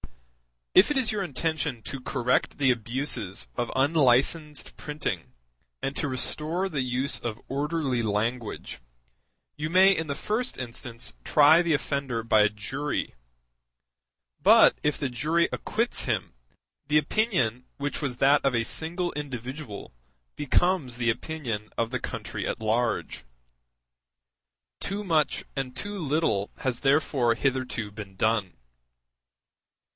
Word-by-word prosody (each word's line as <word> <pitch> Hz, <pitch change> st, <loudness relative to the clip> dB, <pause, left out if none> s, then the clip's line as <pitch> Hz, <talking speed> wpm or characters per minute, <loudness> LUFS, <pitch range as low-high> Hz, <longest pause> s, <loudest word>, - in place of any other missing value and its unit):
If 185 Hz, -, +7 dB
it 295 Hz, -, +1 dB
is 255 Hz, -4 st, +2 dB
your 210 Hz, -2 st, -1 dB
intention 155 Hz, -, -2 dB
to 135 Hz, -, -5 dB
correct 125 Hz, -1 st, 0 dB
the 135 Hz, -3 st, +4 dB
abuses 115 Hz, -, -3 dB
of 120 Hz, -, -2 dB
unlicensed 145 Hz, +2 st, +2 dB
printing 150 Hz, 0 st, -4 dB, 0.5 s
and 135 Hz, -, -2 dB
to 150 Hz, -, 0 dB
restore 155 Hz, +7 st, -1 dB
the 145 Hz, -6 st, -1 dB
use 130 Hz, +3 st, 0 dB
of 115 Hz, -1 st, -5 dB
orderly 140 Hz, -2 st, 0 dB
language, 110 Hz, -, -2 dB, 0.8 s
you 155 Hz, +1 st, -2 dB
may 190 Hz, +3 st, +6 dB
in 160 Hz, -2 st, -2 dB
the 140 Hz, -, -2 dB
first 230 Hz, -, -2 dB
instance 120 Hz, -1 st, -6 dB
try 155 Hz, +3 st, +6 dB
the 170 Hz, -2 st, +1 dB
offender 140 Hz, -5 st, -1 dB
by 110 Hz, -2 st, +4 dB
a 105 Hz, -, +5 dB
jury; 130 Hz, +8 st, -3 dB, 1.3 s
but -, -, +7 dB
if 150 Hz, -1 st, +1 dB
the 140 Hz, -, -2 dB
jury 155 Hz, +8 st, +1 dB
acquits 230 Hz, +3 st, 0 dB
him, -, -, -1 dB, 0.5 s
the 150 Hz, -, +4 dB
opinion 150 Hz, -, +1 dB
which 145 Hz, 0 st, -3 dB
was 130 Hz, -4 st, -2 dB
that 140 Hz, +3 st, +4 dB
of 135 Hz, -3 st, +2 dB
a 115 Hz, -, +2 dB
single 175 Hz, +8 st, -1 dB
individual 130 Hz, -4 st, -6 dB, 0.4 s
becomes 150 Hz, -3 st, +1 dB
the 120 Hz, -1 st, +1 dB
opinion 115 Hz, -6 st, -4 dB
of 115 Hz, 0 st, 0 dB
the 125 Hz, -, -1 dB
country -, -, -4 dB
at -, -, -3 dB
large. 115 Hz, -, -1 dB, 1.5 s
Too 200 Hz, +2 st, -2 dB
much 160 Hz, -6 st, +1 dB
and 135 Hz, -2 st, -3 dB
too 205 Hz, +4 st, -5 dB
little 145 Hz, -, 0 dB
has 130 Hz, -3 st, -1 dB
therefore 135 Hz, -4 st, +2 dB
hitherto 130 Hz, -4 st, -1 dB
been 100 Hz, -2 st, -9 dB
done. 105 Hz, -2 st, +1 dB
135 Hz, 130 wpm, -27 LUFS, 120-155 Hz, 1.5 s, If